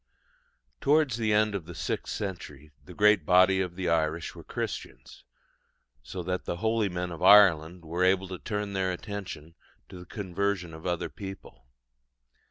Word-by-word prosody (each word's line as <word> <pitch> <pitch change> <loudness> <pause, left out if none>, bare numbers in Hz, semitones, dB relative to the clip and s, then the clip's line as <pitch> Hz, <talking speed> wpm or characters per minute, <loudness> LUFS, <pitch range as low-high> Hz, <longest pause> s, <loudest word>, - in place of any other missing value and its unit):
Towards 145 -4 +2
the 110 -2 0
end 105 0 +3
of 90 -5 -5
the 85 - -9
sixth 85 - -3
century 75 -7 -6
the 90 - -12
great 105 -4 +4
body 95 +3 +5
of 90 -2 -4
the 90 -1 -3
Irish 80 -1 0
were - - -11
Christians, - - -6 0.8
so 90 +9 -7
that 90 +1 -3
the 85 - -3
holy 110 0 +1
men 90 0 -4
of 85 - -8
Ireland 90 -4 +6
were 85 +3 -1
able 95 +1 +3
to 95 -2 -6
turn 105 -2 -4
their 95 -1 0
attention 90 -4 -7 0.4
to 90 - -10
the 90 - -11
conversion 95 -3 -2
of 80 +2 -8
other 85 -1 -2
people. 95 - -10
90 Hz, 165 wpm, -28 LUFS, 85-100 Hz, 0.8 s, Ireland